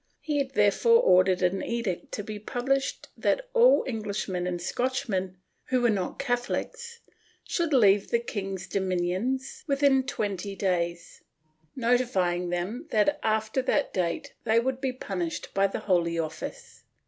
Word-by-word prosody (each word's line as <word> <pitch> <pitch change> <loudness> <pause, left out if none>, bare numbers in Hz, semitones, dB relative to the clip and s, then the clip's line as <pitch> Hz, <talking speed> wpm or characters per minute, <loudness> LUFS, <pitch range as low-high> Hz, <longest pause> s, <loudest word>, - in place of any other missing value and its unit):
He 295 -2 -1
had 270 -1 -3
therefore 465 - +5
ordered 185 - +4
an 180 +2 +1
edict 235 -7 -3
to 205 - -3
be 210 0 -6
pubhshed 270 +5 -1
that - - 0
all - - +5
Enghsh 215 -5 -3
men 180 -2 -2
and 175 -1 -2
Scotchmen, 190 -3 -2 0.3
who 255 - +1
were 240 -2 +4
not 190 -4 -2
Catholics, 470 - -3 0.4
should 340 -3 -1
leave 205 -7 +4
the 235 - +3
king's 195 -5 -4
dominions 190 +8 -2
within 275 -1 +4
twenty 200 -6 -3
days, 175 -3 -2 0.5
notifying 215 -8 +1
them 195 - -3
that 290 +8 +2
after 220 +3 0
that 285 +3 0
date 170 -3 -2
they 225 0 +3
would 260 +2 -2
be 265 -2 0
punished 185 -9 -4
by 195 0 +3
the 195 - -5
Holy 170 -3 +1
Office. 160 -1 -6
215 Hz, 145 wpm, -27 LUFS, 185-260 Hz, 0.5 s, therefore